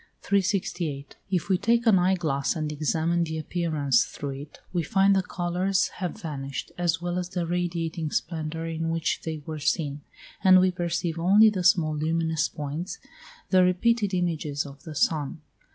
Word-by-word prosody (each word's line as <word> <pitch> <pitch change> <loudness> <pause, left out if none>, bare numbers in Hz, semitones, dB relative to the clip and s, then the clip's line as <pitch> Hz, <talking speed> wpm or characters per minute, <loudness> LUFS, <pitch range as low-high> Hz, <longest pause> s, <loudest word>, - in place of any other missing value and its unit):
368. 180 -7 -1
If 185 -3 0
we 190 -2 +2
take 235 +4 +2
an 210 -5 +6
eye 185 +2 +3
glass, 155 -5 -1
and 155 -2 -2
examine 160 +3 0
the 160 -1 -3
appearance 155 -6 +1
through 140 -1 -6
it, 140 +2 -9
we 175 - +1
find 195 +2 +3
the 190 - +3
colours 180 +1 0
have 180 +3 -4
vanished, 140 -7 -5
as 175 -1 0
well 175 +1 -1
as 180 -1 -4
the 180 -2 -2
radiating 170 -2 -2
splendour 160 0 -3
in 165 0 -2
which 165 0 -1
they 160 -2 -5
were 155 -1 -5
seen, 145 -1 -1 0.4
and 185 -1 +8
we 185 0 +3
perceive 170 -1 -2
only 205 +6 +6
the 185 -3 -2
small 170 -4 +3
luminous 160 0 0
points, 150 +6 -5 0.5
the 185 -1 +6
repeated 205 +3 +2
images 155 -5 -1
of 140 0 -11
the 155 -2 -7
sun. 155 -1 0
170 Hz, 170 wpm, -26 LUFS, 155-185 Hz, 0.5 s, and